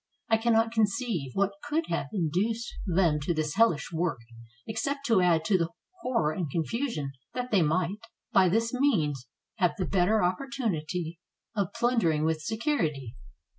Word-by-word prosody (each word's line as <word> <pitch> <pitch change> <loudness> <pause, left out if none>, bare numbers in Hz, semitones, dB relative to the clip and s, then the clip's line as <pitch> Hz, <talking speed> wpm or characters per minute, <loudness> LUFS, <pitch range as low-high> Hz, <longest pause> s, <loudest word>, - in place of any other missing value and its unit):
I 225 - +5
can 235 +1 +2
not 225 0 +3
conceive 215 - 0
what 200 0 0
could 300 +3 0
have 165 -4 -1
induced 205 +6 -1
them 170 -4 +3
to 155 +4 -1
this 155 -1 -1
hellish 210 -9 +2
work, 165 -3 0 0.5
except 280 +5 -2
to 225 -7 +4
add 165 -3 +3
to 190 +1 +3
the 170 0 0 0.3
horror 235 - +1
and 160 -1 -3
confusion 170 - -2 0.2
that 250 0 -3
they 200 -4 +4
might, 175 +5 +1 0.3
by 185 -2 +6
this 230 +5 +1
means, 155 - +1 0.3
have 180 -5 +2
the 185 - -1
better 195 +4 +2
oppor 185 +9 0
tunity 170 -5 -2 0.4
of 200 -4 0
plundering 230 -11 +2
with 160 -1 0
security. 155 - -1
185 Hz, 160 wpm, -28 LUFS, 160-230 Hz, 0.5 s, by